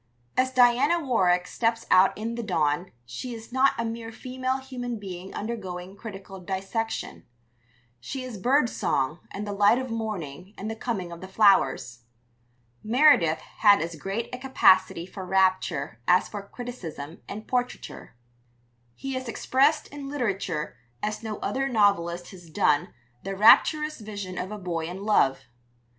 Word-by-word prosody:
As 260 0 +3
Diana 255 +6 +4
Warwick 185 - +2
steps 230 +2 -1
out 185 +1 +5
in 225 +2 -3
the 235 - -3
dawn 170 -4 0
she 230 - -6
is 225 +1 -11
not 265 +1 +4
a 230 - -1
mere 225 0 -5
female 255 +2 -3
human 250 -3 -5
being 190 -2 -8
undergoing 190 -4 -5
critical 195 -2 -9
dissection; 195 +5 -4 0.8
she 255 - -6
is 245 -6 -7
bird 255 +5 +3
song 150 - -1
and 205 +1 -5
the 205 - -4
light 205 +3 +4
of 260 -2 -4
morning 195 -5 -5
and 215 +3 -4
the - - -4
coming 210 -7 -3
of 170 - -9
the 190 - -7
flowers. 190 - +3 0.8
Meredith 225 - +4 0.2
had 205 -2 +7
as 165 +1 -3
great 195 +8 -3
a 250 - -4
capacity 190 -9 +3
for 190 +1 -8
rapture 185 -9 +1
as 180 +1 +4
for 205 - -6
criticism 190 - -8
and 215 +1 -7
portraiture. 250 - -3 0.8
He 270 0 -5
has 260 -1 -4
expressed 280 +6 +2
in 280 -1 -7
literature 195 - -2 0.3
as 215 0 -2
no 220 -2 -5
other 270 +1 -1
novelist 180 -6 +1
has 175 -4 -13
done 150 -1 +2 0.3
the 195 0 -4
rapturous 300 +9 +5
vision 205 -4 -6
of 185 - -4
a 210 - -5
boy 175 -4 -3
in 185 +3 -7
love. 135 -11 +3
205 Hz, 150 wpm, -26 LUFS, 180-245 Hz, 0.8 s, had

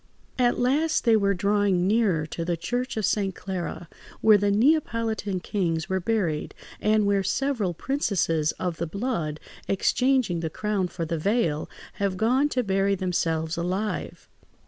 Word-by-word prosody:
At 245 -1 +3
last 300 +6 +1
they 230 -1 +5
were 200 -2 +2
drawing 200 -1 +2
nearer 195 -7 +2
to 165 +2 -5
the 170 0 -1
church 245 +8 -3
of 215 - +1
St. 195 -3 0
Clara, 180 -2 -5 0.3
where 215 -2 +6
the 205 +1 +1
Neapolitan 225 - +1
kings 165 -6 -1
were 190 0 +1
buried, 185 -6 -1 0.2
and 215 0 +2
where 200 -1 +2
several 210 -2 -1
princesses 165 - 0
of 175 -3 -3
the 170 - -2
blood, 170 - -3 0.3
exchanging 250 -1 +1
the 165 -1 -2
crown 205 +1 -1
for 170 -1 -4
the 165 0 -2
veil, 170 -5 0 0.3
have 195 -2 0
gone 255 +8 +2
to 255 -3 0
bury 195 -1 +1
themselves 165 -3 -1
alive. 185 +5 -3
200 Hz, 150 wpm, -25 LUFS, 175-225 Hz, 0.3 s, where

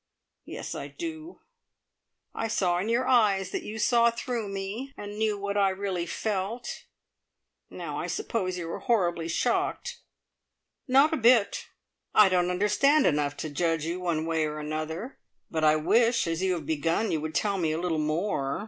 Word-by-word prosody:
Yes, - - -6
I - - -5
do. 325 0 -7 0.9
I - - -2
saw 180 -5 +1
in 200 +5 -2
your 240 +2 +1
eyes 200 -6 +3
that - - -2
you 215 - -7
saw 235 +1 +4
through 235 -2 -3
me, 200 +8 -5
and 205 +1 -7
knew 215 -2 +1
what 200 0 -3
I 200 -1 +4
really 190 -2 -3
felt. 215 +5 -3 0.8
Now - - -5
I - - -3
suppose 195 - -2
you 170 -2 -5
are - - -4
horribly 175 -8 +1
shocked?" 235 +8 -1 0.9
"Not 275 +5 +5
a - - +1
bit. 235 -3 +3 0.5
I 210 -2 +7
don't 180 -1 +2
understand 210 +11 +3
enough 145 -2 +1
to - - -3
judge 165 +1 0
you 170 +2 -3
one 170 -3 -1
way 160 -1 +1
or 150 0 -5
another; 155 - -5 0.3
but 160 -1 -1
I 155 0 +5
wish, 230 +9 +3
as 165 +1 -2
you 190 -1 +2
have 165 -4 -4
begun, 165 +8 0
you 155 - 0
would 155 0 -5
tell 200 -2 +1
me 160 -3 +1
a 155 - -1
little 170 -3 -1
more. 155 -2 -1
195 Hz, 175 wpm, -27 LUFS, 165-230 Hz, 0.9 s, I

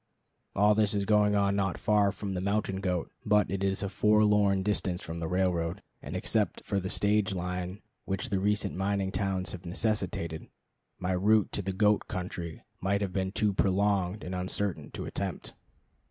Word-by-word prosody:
All 105 +2 +5
this 105 -1 +2
is 100 -1 0
going 105 0 +4
on 100 -1 +2
not 95 -3 0
far 105 -2 +3
from 100 0 -5
the 90 - -2
mountain 100 0 0
goat, 90 -3 -2
but 105 -4 +3
it 100 0 -2
is 95 +1 0
a - - 0
forlorn 105 -1 +3
distance 95 -3 0
from 80 +1 -5
the 80 - -3
railroad; 90 0 0 0.2
and - - -6
except - - 0
for 100 - 0
the 95 0 -4
stage 105 -1 +1
line 90 +2 -4 0.2
which 95 0 -2
the 100 -2 0
recent 105 0 +1
mining 95 0 0
towns 95 -2 -1
have 90 -1 -8
necessitated, 90 -4 -2 0.5
my 90 0 -2
route 105 +3 +3
to - - -2
the 95 0 -2
goat 105 +2 +2
country 90 -4 -5 0.2
might 100 +2 0
have 95 -3 -2
been 95 0 -1
too 105 0 +1
prolonged 100 0 +1
and 90 - -5
uncertain 90 +1 -2
to - - -6
attempt. 95 -2 -4
95 Hz, 180 wpm, -29 LUFS, 90-105 Hz, 0.5 s, All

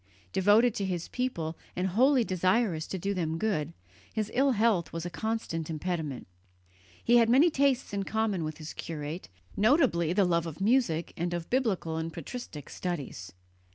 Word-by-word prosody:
Devoted 210 +5 +5
to 200 - -3
his 180 -3 -3
people 170 -11 -2 0.2
and 185 +2 0
wholly 255 +6 +4
desirous 185 -3 +1
to 190 - -4
do 195 +3 -1
them 165 -4 -1
good, 165 -6 -1 0.4
his 215 -1 -2
ill 270 +1 +3
health 210 -7 +2
was 165 0 -4
a 175 - -4
constant 220 -7 -3
impediment. 160 -4 -3 0.8
He 240 +1 +5
had 230 -1 +5
many 285 +8 +6
tastes 270 -5 +1
in 200 - 0
common 210 -3 -1
with 155 -1 -4
his 155 -1 -7
curate, 155 +1 -6 0.3
notably 215 - +3
the 195 +2 +3
love 170 -1 +1
of 160 0 -7
music 195 -7 +1
and 175 +1 -2
of 170 -1 -6
biblical 205 -11 0
and 160 0 -3
patristic 165 - -7
studies. 145 - -5
185 Hz, 165 wpm, -29 LUFS, 165-230 Hz, 0.8 s, many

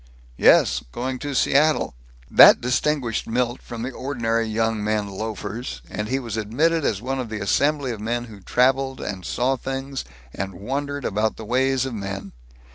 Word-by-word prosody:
"Yes. - - +5
Going 130 +1 -3
to 145 0 -4
Seattle." 150 +4 +3 0.3
That - - +8
distinguished 125 -1 0
Milt 120 +1 -1
from 115 -1 -7
the 130 - -3
ordinary 115 -4 -1
young 110 0 0
men 105 -1 0
loafers, 110 +4 -5
and 105 0 -3
he 130 - +1
was 115 -5 -4
admitted 150 +10 +1
as 105 -5 -1
one 135 +1 -2
of 125 -3 -4
the 110 -1 -4
assembly 140 +6 +1
of 110 -3 -6
men 120 +2 -1
who 110 -4 -11
traveled 130 +5 +1
and 95 -3 -5
saw 130 +10 0
things 135 +1 -4 0.3
and 95 -1 -4
wondered 140 +8 -3
about 105 +2 0
the 110 - -8
ways 130 +2 +1
of 130 - -4
men. 100 -2 -5
120 Hz, 170 wpm, -23 LUFS, 110-135 Hz, 0.3 s, That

